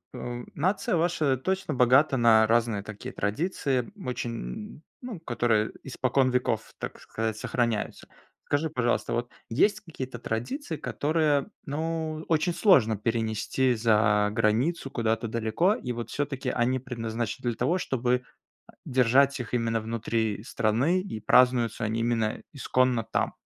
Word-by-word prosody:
э, 120 0 -5
нация 185 +7 0
ваша 160 -5 +1
точно 185 +3 -2
богата 130 +3 +4
на 110 -2 +5
разные 115 -2 +2
такие 105 0 -8
традиции 130 - -1
очень, 115 - -5 0.2
ну, 245 -8 -6
которые 120 -7 +1
испокон 130 0 +1
веков, 125 -3 -1
так - - -6
сказать, 110 -1 -3
сохраняются. 115 -2 -2 0.4
Скажи, 150 +2 0
пожалуйста, 120 -5 0
вот 120 +1 -2 0.2
есть 205 - +3
какие-то 130 -9 -7
традиции, 155 - -4
которые, 150 -2 +1 0.2
ну, 160 +1 -3
очень 170 +2 +1
сложно 115 - +4
перенести 115 +3 0
за 105 -2 +3
границу, 115 +8 +1
куда-то 115 -3 -1
далеко? 115 - +1
И 125 - -5
вот 120 -1 -5
всё-таки 140 -2 -2
они 125 +1 +1
предназначены 120 -2 -3
для 120 - -2
того, 135 +11 +1
чтобы, 125 -7 0
э, 125 0 -10 0.4
держать 130 +2 +3
их 125 0 -5
именно 115 -1 +1
внутри 110 -1 -2
страны, 120 +9 +1
и 185 - -6
празднуются 120 0 +3
они 110 +2 -1
именно 115 -2 0
исконно 130 -4 +1
там? - - -1
125 Hz, 135 wpm, -27 LUFS, 115-145 Hz, 0.4 s, на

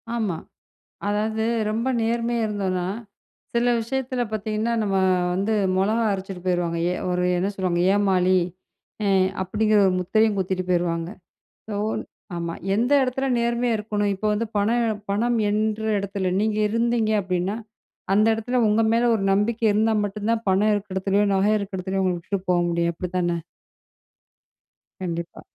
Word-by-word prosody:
ஆமா. 205 -8 -1 0.7
அதாவது 220 +2 0 0.3
ரொம்ப 230 +4 -1
நேர்மையா 230 0 0
இருந்தோன்னா! 185 -4 -2 0.7
சில 240 +1 +2
விஷயத்தில 255 +1 -2
பாத்தீங்கன்னா, 215 +2 -1
நம்ம 195 -2 0 0.4
வந்து 200 +4 0 0.2
மொளகா 215 +4 +2
அரச்சுட்டு 190 -1 -6
போயிருவாங்க. 175 -2 0
ஏ - - 0 0.2
ஒரு 180 0 0
என்ன 190 +3 0
சொல்லுவாங்க? 180 -2 0
"ஏமாளி" 185 -2 +3 0.7
அ - - +2 0.3
அப்பிடிங்கிற 210 +3 +2
ஒரு 185 - +2
முத்திரையும் 210 +3 +2
குத்திட்டு 185 -1 -1
போயிருவாங்க. 170 -1 0 0.5
இப்போ 210 -2 -5
ஒரு - - -2 0.3
ஆமா. 170 -1 -3 0.2
எந்த 240 +5 +1
எடத்தில 260 +1 -1
நேர்மையா 235 0 +1
இருக்கணும் 210 -1 -1
இப்ப 205 - -6
வந்து 220 +2 -1
பண 205 +1 +2 0.2
எ - - +1 0.2
பணம் 235 +4 +1
எண்ற 215 +1 0 0.2
எடத்தில, 195 -1 -2
நீங்க 215 0 0
இருந்தீங்க 230 0 +1
அப்டின்னா, 185 +2 -1 0.6
அந்த 210 +2 +4
எடத்ல 245 +3 -1
உங்க 215 +2 +3
மேல 235 - +2
ஒரு 195 - -2
நம்பிக்கை 220 +3 +1
இருந்தா 220 +2 +2
மட்டும் 205 +1 -3
தான் 230 0 0
பணம் 205 +3 +3
இருக்க 205 -2 -3
எடத்துலயோ, 195 +2 +2
நகை 195 +2 +3
இருக்க 200 -2 -5
எடத்துலயோ, 190 +1 -2
உங்கள 185 -1 +1
விட்டுட்டு 190 +3 -4
போ 180 - +4
முடியும் 170 0 +1
அப்பிடி 180 +1 -4
தான? 175 -1 +1 1.7
கண்டிப்பா. 170 -2 -5
205 Hz, 150 wpm, -23 LUFS, 185-220 Hz, 1.7 s, அந்த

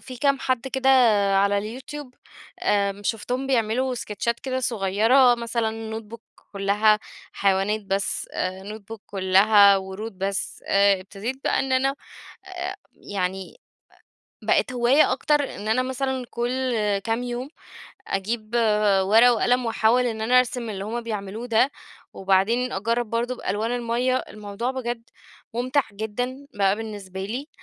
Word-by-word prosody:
في 255 -1 -9
كام 275 +2 +2
حد 255 0 -1
كده 265 0 0 0.5
على 205 +5 0
الYouTube 295 +1 -8 0.5
آمم، 200 0 +1
شوفتهم 245 +5 -2
بيعملوا 255 +1 +1
اسكتشات 235 0 -3
كده 260 -1 -2
صُغيرة، 230 +3 +3
مثلًا 225 -1 -3
notebook 225 +1 -12 0.3
كُلّها 205 +2 +3 0.3
حيوانات 195 +2 +1
بس، 195 0 -2
آآ 185 +1 -3
notebook 220 +1 -10
كُلّها 200 +1 +5
ورود 190 +2 -6
بس، 195 0 -3
آآ 200 -1 +4
أبتديت 205 +7 -5
بقى - - +1
إن 270 -1 -2
أنا 270 +2 +2 0.5
أ 370 +1 -5 0.2
يعني 190 - -4 0.9
أ - - -12
بقت 255 - +2
هواية 250 +5 +4
أكتر، 295 -2 0
إن 210 - -7
أنا 225 +4 +2
مثلًا 260 0 -2
كُلّ 250 +1 -1 0.3
كام 230 +2 -1
يوم 245 +3 -4 0.6
أجيب 215 +3 -3 0.5
ورقة 225 +5 +6
وقلم، 245 +1 +1
وأحاول 230 +2 +2
إن 220 -2 -3
أنا 245 +3 +4
أرسم 245 -2 0
اللي 195 -1 -5
هُم 235 +3 -3
بيعملوه 215 +1 -5
ده 230 +3 +3 0.4
وبعدين 195 +7 +1
أجرّب 230 +4 -1
برضه 240 +2 -1
بألوان 210 +4 -2
المَيّة. 245 +2 0
الموضوع 210 +1 -4
بجد 240 -3 -4 0.5
مُمتع 255 +4 +1
جدًا 245 +6 -4
بقى 195 -1 +2
بالنسبة 205 -4 -7
لي، 255 +9 -5
230 Hz, 135 wpm, -24 LUFS, 200-255 Hz, 0.9 s, ورقة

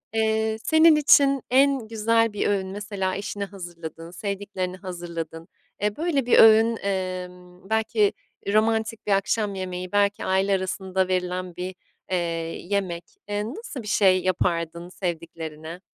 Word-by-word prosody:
Eee, 220 0 +1
senin 315 0 +6
için 275 -2 +5
en 270 -2 +3
güzel 225 0 +2
bir 205 - 0
öğün 195 -2 0
mesela 195 -1 -3
eşine 200 0 -4
hazırladığın, 170 -4 -9
sevdiklerine 195 -1 -4
hazırladığın, 170 -3 -6 0.3
eee, 210 0 0
böyle 305 -5 0
bir 245 - +5
öğün, 225 +1 +7
emm, 185 -1 -5
belki 220 -2 +2 0.4
romantik 220 0 +1
bir - - +1
akşam 200 +1 +1
yemeği, 185 -1 -5
belki 205 0 +1
aile 190 +1 +2
arasında 190 0 -1
verilen 180 -1 -2
bir, 180 +1 -5 0.4
eee, 185 - +2 0.5
yemek. 185 -4 -1 0.3
Eee, 205 0 -1
nasıl 275 - -7
bir - - -9
şey 190 -3 +4
yapardın 170 -2 -1
sevdiklerine? 165 -2 -6
195 Hz, 130 wpm, -25 LUFS, 180-220 Hz, 0.5 s, öğün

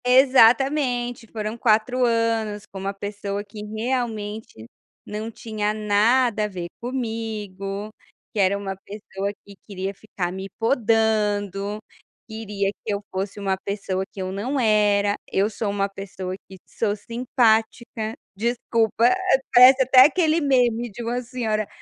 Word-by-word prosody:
Exatamente, 250 -1 +4
foram 215 0 -4
4 235 +2 +2
anos 225 -3 0
com 195 - -10
uma 195 +1 -3
pessoa 200 0 -5
que 210 +1 -10
realmente 220 - -4 0.4
não 215 +2 -5
tinha 215 -2 -3
nada 215 +2 +2
a - - -1
ver 180 -4 -6
comigo, 215 -5 -4 0.4
que 215 - -3
era 195 0 +3
uma 195 -1 -4
pessoa 200 -1 -5
que 200 - -12
queria 195 -1 -4
ficar 190 -3 -5
me 190 +1 -6
podando, 210 -4 +1 0.5
queria 210 -3 -3
que 215 - -3
eu 200 0 -3
fosse 195 +2 -4
uma 195 -1 0
pessoa 195 -2 -2
que - - -11
eu 185 - -4
não 245 +9 -2
era, 205 -3 +3 0.2
eu 200 +3 +1
sou 210 0 -3
uma 200 0 0
pessoa 195 -2 -7 0.2
que 190 - -11
sou 210 -2 -1
simpática, 225 -1 0 0.2
desculpa, 230 +1 +1 0.4
parece 255 +2 +8
até 260 0 +8
aquele 320 +1 +2
meme 245 -4 +2
de 235 +4 -7
uma 240 +2 -2
senhora, 225 -4 -2
215 Hz, 135 wpm, -23 LUFS, 200-235 Hz, 0.5 s, parece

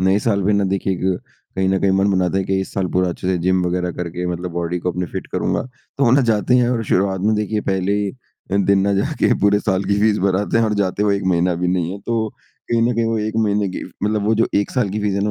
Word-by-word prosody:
नए 95 +2 +3
साल 100 -4 +1
पे 105 - +3
ना 100 0 +2
देखिए 100 0 0
एक, 90 - -4 0.6
कहीं 95 0 +1
न 95 0 +2
कहीं 100 - +2
मन 95 +1 +2
बनाता 95 0 +1
है 95 - -1
कि 95 0 0
इस 95 - -6
साल 95 -2 0
पूरा 90 0 +2
अच्छे 90 - -5
से 95 - +1
जिम 95 -1 +3
वग़ैरह 90 0 -1
करके 90 +1 -4
मतलब 90 +1 -5
बॉडी 85 0 -2
को 90 +1 -2
अपनी 90 +1 -3
फिट - - -5
करूँगा। - - 0
तो 130 +2 -5
वो 120 - +4
ना 135 +3 +5
जाते 115 -1 +2
हैं 120 -1 +3
और 120 -2 0
शुरुआत 95 0 +1
में 110 +3 +2
देखिए, 105 0 -1
पहले 95 -1 -1
ही 100 -1 0
अ, 100 -5 -8
दिन 100 0 +3
ना 100 +1 +1
जा 100 - 0
के - - +4
पूरे 100 +1 +4
साल 95 -2 0
की 100 0 +1
फ़ीस 105 0 +3
भर 95 -1 +1
आते 110 +2 0
हैं 115 - +3
और 110 -1 0
जाते 95 +2 -2
हुए 100 -1 +2
1 100 - -5
महीना 90 +1 +2
भी 90 - +2
नहीं 90 -1 0
है। 100 - -6
तो 115 -2 0 0.4
कहीं 115 -1 +2
न - - -1
कहीं 115 0 +1
वो 115 -1 0
1 110 +1 -3
महीने 105 -1 +1
की 90 - -5
फ़ - - -11
मतलब 105 -1 0
वो 110 - +3
जो 115 - +2
1 100 0 +1
साल 125 -6 0
की 105 - -3
फ़ीस 105 -2 0
है 100 - 0
ना 105 - 0
100 Hz, 300 wpm, -20 LUFS, 95-105 Hz, 0.6 s, ना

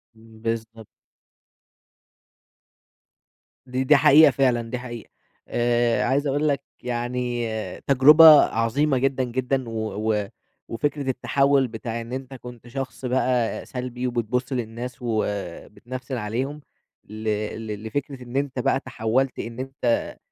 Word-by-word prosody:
بالضبط. 115 0 -6 2.8
دي 130 0 -2
دي 150 +3 +5
حقيقة 145 +2 +7
فعلًا، 125 -4 +2
دي 125 0 -3
حقيقة. 120 -2 -8 0.4
آآ، 120 0 +1
عايز 140 +4 +1
أقول 145 +2 +1
لك 140 -1 +1 0.2
يعني 120 -1 -2 0.4
تجربة 145 +4 +8 0.2
عظيمة 130 +5 +1
جدًا، 130 0 +1
جدًا. 125 0 -2
و 110 -1 -2
و 105 -1 -1 0.4
وفكرة 140 +3 -2
التحوّل 135 +1 +2
بتاع 115 +1 -5
إن 115 +2 -8
أنت 135 0 -6
كنت 125 -2 -11
شخص 135 +1 -6
بقى 125 -2 0
سلبي، 125 0 -4
وبتبُص 125 +2 -2
للناس، 120 0 -5
وبتنفسن 120 +3 -4
عليهم، 130 +8 -3 0.5
ل 110 +1 -8 0.4
ل 105 0 -6
لفكرة 130 +3 -4
إن 120 +2 -10
أنت 140 -2 -1
بقى 130 - +1
تحوّلت 130 +1 -1
إن 115 +1 -6
أنت 130 -3 -2
125 Hz, 120 wpm, -24 LUFS, 115-135 Hz, 2.8 s, تجربة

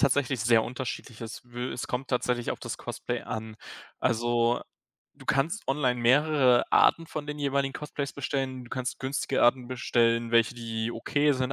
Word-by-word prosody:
tatsächlich 135 -2 +2
sehr 115 0 +4
unterschiedlich. 125 -2 -6
Es 115 -1 -7
will 120 +1 -5
es - - -4
kommt 125 +2 -3
tatsächlich 125 -1 0
auf - - -3
das - - -5
Cosplay - - -4
an. 110 0 -6 0.4
Also, 120 0 +2 0.5
du - - -15
kannst 155 +10 0
online 130 -3 +1
mehrere 130 0 +4
Arten 165 - +4
von 155 -2 -5
den 150 0 -5
jeweiligen 140 -1 0
Cosplays 145 -1 -4
bestellen. 135 -2 -3
Du 120 - -15
kannst 130 0 -3
günstige 135 0 -1
Arten 125 +1 +4
bestellen, 115 -2 +1
welche, 115 +1 +4
die 115 -1 -3
okay 145 +5 +1
sind, 130 0 -1
125 Hz, 165 wpm, -28 LUFS, 120-140 Hz, 0.5 s, sehr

